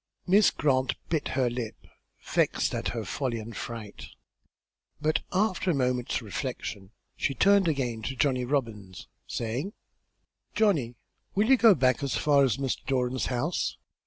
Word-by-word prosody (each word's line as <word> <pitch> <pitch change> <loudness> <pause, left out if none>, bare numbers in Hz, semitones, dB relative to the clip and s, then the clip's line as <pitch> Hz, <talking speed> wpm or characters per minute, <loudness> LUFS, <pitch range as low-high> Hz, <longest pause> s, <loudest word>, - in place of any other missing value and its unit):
Miss 195 +3 +5
Grant 130 -3 +1
bit 160 -3 0
her 130 -2 +3
lip, 120 -2 -4 0.5
vexed - - +1
at - - -2
her 115 -3 -3
folly 125 +3 -2
and 110 0 -7
fright. 110 -1 -7 0.9
But 155 0 +1
after 190 -1 +1
a 170 - +2
moment's 125 -2 0
reflection 105 -3 -5 0.3
she 135 - -1
turned 200 +4 +4
again 125 -7 -1
to 135 - -5
Johnny 130 -2 +1
Robbins, 115 -8 -3 0.2
saying: 125 - -3 0.8
"Johnny, 170 - +2 0.4
will 205 +3 +3
you 265 - +8
go 230 -5 +6
back 130 -1 +2
as 140 -2 -1
far 145 -2 +4
as 130 -1 +2
Mr. 135 -2 -2
Doran's 130 -1 0
house? 135 +7 -1
130 Hz, 145 wpm, -28 LUFS, 120-155 Hz, 0.9 s, you